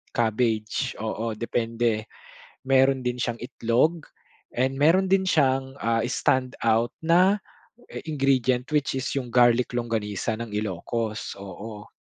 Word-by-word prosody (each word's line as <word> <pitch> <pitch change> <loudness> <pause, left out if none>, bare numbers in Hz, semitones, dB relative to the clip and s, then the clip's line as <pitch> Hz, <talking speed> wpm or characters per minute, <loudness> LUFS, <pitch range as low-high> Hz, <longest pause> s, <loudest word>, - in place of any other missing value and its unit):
cabbagge. 110 -1 0
Oo, 110 0 -3
depende. 115 -1 -1 0.6
Meron 135 0 +3
din 125 0 -2
siyang 120 -1 -2
itlog 130 +6 0 0.5
and 130 +2 0
meron 180 +6 +4
din 190 0 +3
siyang, 135 -5 +2
ah, 115 0 +1
stand 130 0 0
out 115 +1 +2
na 185 +5 +4 0.5
i - - -11 0.2
ingredient 130 -3 +1
which 145 -2 +1
is 130 0 -2
yung 125 -3 -3
garlic 120 0 +4
longganisa 110 -3 -2
ng 115 -1 -7
Ilocos, 105 +2 -3
oo. 105 +2 -9
120 Hz, 125 wpm, -25 LUFS, 115-135 Hz, 0.6 s, meron